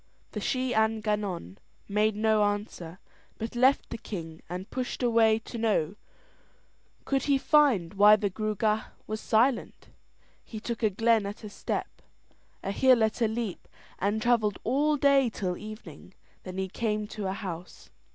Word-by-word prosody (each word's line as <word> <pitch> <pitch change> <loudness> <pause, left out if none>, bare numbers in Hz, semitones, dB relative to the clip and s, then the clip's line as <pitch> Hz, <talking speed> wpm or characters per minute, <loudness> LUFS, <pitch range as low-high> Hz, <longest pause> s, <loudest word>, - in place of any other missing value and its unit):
The 210 - -4
Shee 255 +4 -1
an 220 0 +2
Gannon 205 - -3 0.3
made 210 +1 +1
no 215 0 +3
answer, 205 -5 -3 0.4
but 225 +1 -5
left 260 +3 +3
the 230 - -5
king 165 -7 -7
and 180 +2 -5
pushed 255 0 -3
away 225 -2 +4
to 230 +1 -8
know 205 -6 +1 1.1
could 270 -1 0
he 280 -1 +3
find 265 - +3
why 205 +1 +7
the 205 -2 -1
Gruagach 215 +1 -1
was 215 0 -4
silent. 235 +2 +1 0.5
He 220 - -8
took 235 +1 -5
a 220 - +3
glen 225 +1 +2
at 205 +2 -8
a 210 - -6
step, - - -4 0.6
a 195 - -2
hill 255 +2 +4
at 220 +2 0
a 230 - +4
leap, 220 -3 -4 0.3
and 205 +3 0
travelled 220 -3 +2
all 295 +5 +2
day 275 -3 +4
till 185 -4 -3
evening. 190 -5 -10 0.3
Then 185 0 -7
he 190 0 -1
came 210 +1 -2
to 205 -3 -4
a 190 - -1
house. 180 -3 -8
215 Hz, 160 wpm, -28 LUFS, 200-235 Hz, 1.1 s, why